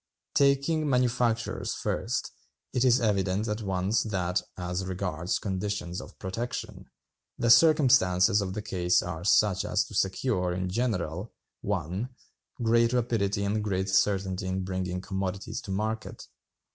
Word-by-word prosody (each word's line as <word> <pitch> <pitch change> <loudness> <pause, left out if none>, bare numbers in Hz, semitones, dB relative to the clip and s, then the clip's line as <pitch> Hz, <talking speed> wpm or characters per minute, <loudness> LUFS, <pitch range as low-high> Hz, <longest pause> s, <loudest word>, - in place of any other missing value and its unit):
"Taking 140 +2 +2
manufactures 120 -3 0
first, - - -2 0.4
it 125 -1 +2
is 125 -1 +5
evident 100 -2 +1
at 105 +1 -2
once 95 +2 0
that, 90 -3 -1 0.2
as 90 0 -3
regards 90 -2 -2
conditions 95 -2 -3
of - - -13
protection, 115 +6 -5 0.5
the 120 - +3
circumstances 120 - +5
of 95 -1 -4
the 105 - -4
case 90 -4 +1
are 85 -2 -5
such 100 0 +3
as - - +1
to - - -12
secure, 95 -2 0
in 90 +1 -2
general, 100 -3 -2 0.3
(1.) 95 +4 -2 0.5
great 115 +1 +3
rapidity 110 -5 0
and 105 +1 0
great 95 -2 -1
certainty 95 0 +1
in 95 0 -2
bringing 90 -1 -3
commodities 95 +3 -4
to - - -11
market. 110 +2 -3
100 Hz, 135 wpm, -28 LUFS, 95-115 Hz, 0.5 s, is